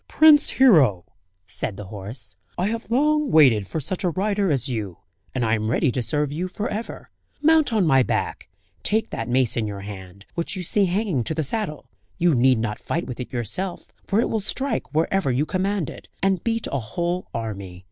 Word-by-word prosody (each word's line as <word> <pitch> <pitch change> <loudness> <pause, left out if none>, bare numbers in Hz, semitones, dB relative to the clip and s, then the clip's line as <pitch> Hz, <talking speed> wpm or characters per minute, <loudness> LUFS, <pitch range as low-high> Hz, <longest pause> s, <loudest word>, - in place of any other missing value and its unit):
"Prince 310 -2 +6
Hero!" 145 - +5 0.4
said 95 +2 -4
the 105 - -6
horse, 105 +1 -6 0.2
"I 185 +3 0
have 225 0 -4
long 300 +4 +2
waited 125 - +5
for 160 - -3
such 170 +7 -3
a 180 - +2
rider 200 +1 0
as 135 -2 0
you, 105 -8 -4 0.4
and 125 -2 0
I 110 - +1
am 110 -1 0
ready 130 +3 +2
to 125 - -2
serve 145 +5 0
you 170 +5 -2
for 205 +4 -4
ever. 220 +3 -6 0.3
Mount 315 -1 +4
on 215 -5 +2
my 135 -4 +5
back, - - -2 0.3
take 220 +1 0
that 115 +1 -4
mace 125 -1 +2
in 110 -2 -1
your 100 -1 -6
hand, 100 -1 -10
which 170 +2 -3
you 185 - -4
see 200 +4 +4
hanging 185 - 0
to 160 - -2
the 160 - 0
saddle; 155 -1 -3 0.3
you 175 -2 +3
need 130 0 +4
not 110 -1 -2
fight 170 - -3
with 125 - -7
it 125 - -6
yourself, 130 - -5
for 200 - 0
it 235 - +2
will 220 - -1
strike 255 +5 -1
wherever 165 +1 +1
you 130 +5 +1
command 190 -2 -1
it, - - -10 0.2
and 195 -3 +1
beat 230 -1 -1
a 140 - 0
whole 170 +11 -3
army. 100 -5 -5
155 Hz, 205 wpm, -23 LUFS, -, 0.4 s, Prince